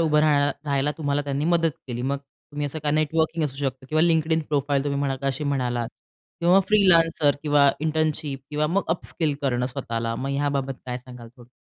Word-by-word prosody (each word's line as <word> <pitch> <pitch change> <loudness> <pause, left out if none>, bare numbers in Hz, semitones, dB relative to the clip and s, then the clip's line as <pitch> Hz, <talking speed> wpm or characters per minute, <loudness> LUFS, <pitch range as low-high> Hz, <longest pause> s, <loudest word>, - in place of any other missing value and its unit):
उभं 155 -2 +3
राहाय 145 -2 +3 0.2
राहायला 140 0 +1
तुम्हाला 145 -2 0
त्यांनी 140 0 -2
मदत 165 -1 +2 0.2
केली? 120 -2 -4
मग 140 +2 -1
तुम्ही 145 +1 -7
असं 145 +2 -4
का, 145 - +2
नेटवर्किंग 160 +1 +1
असू 135 -2 -4
शकतं, 130 -2 -3
किंवा 155 +2 +2
LinkedIn 160 -1 +2
प्रोफाइल 145 -1 0
तुम्ही 140 -1 -1
म्हणाला 135 -2 -1
का, 140 - -3
अशी 135 +2 -1
म्हणालात, 125 -4 -1 0.5
किंवा 175 +3 +5
फ्रीलांसर 165 -8 +4
किंवा 145 -2 +4
इंटर्नशिप 155 -3 -1
किंवा 150 0 0
मग 190 +6 +1
अपस्किल 160 -2 0
करणं 125 -2 0
स्वतःला, 115 -3 -3
मग 130 +4 -4
ह्याबाबत 140 -1 -1
काय 125 -1 -3
सांगाल, 125 -2 -12
थोडं? 120 -2 -16
145 Hz, 185 wpm, -24 LUFS, 135-155 Hz, 0.5 s, किंवा